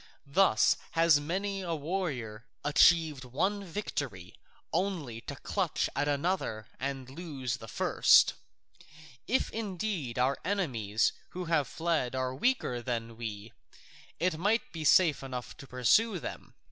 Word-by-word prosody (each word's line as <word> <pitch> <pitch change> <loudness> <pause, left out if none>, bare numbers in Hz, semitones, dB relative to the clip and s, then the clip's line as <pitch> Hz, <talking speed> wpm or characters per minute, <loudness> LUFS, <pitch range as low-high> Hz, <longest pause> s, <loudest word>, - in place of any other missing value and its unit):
Thus 140 - +4 0.2
has 165 -2 +5
many 195 +6 -2
a 170 -3 -2
warrior 140 - -4 0.2
achieved 155 -1 +4
one 190 +11 -1
victory 140 - -5 0.4
only 160 - -2
to 140 - -4
clutch 180 +3 -1
at 145 - 0
another 145 - -1
and 135 -1 -3
lose 135 -4 -4
the 115 - -10
first. - - +5 0.9
If 260 - +1
indeed, 190 - -3
our 130 +2 +2
enemies 120 - 0 0.2
who 180 0 -5
have 165 -4 +1
fled 160 -7 -1
were 130 0 -1
weaker 130 - 0
than 115 -2 -3
we, 110 -2 -6 0.7
it 170 -1 0
might 210 +6 +1
be 160 -2 -5
safe 155 0 +5
enough 125 -2 -6
to 140 - -11
pursue 185 - +3
them. - - -8
145 Hz, 130 wpm, -30 LUFS, 125-180 Hz, 0.9 s, has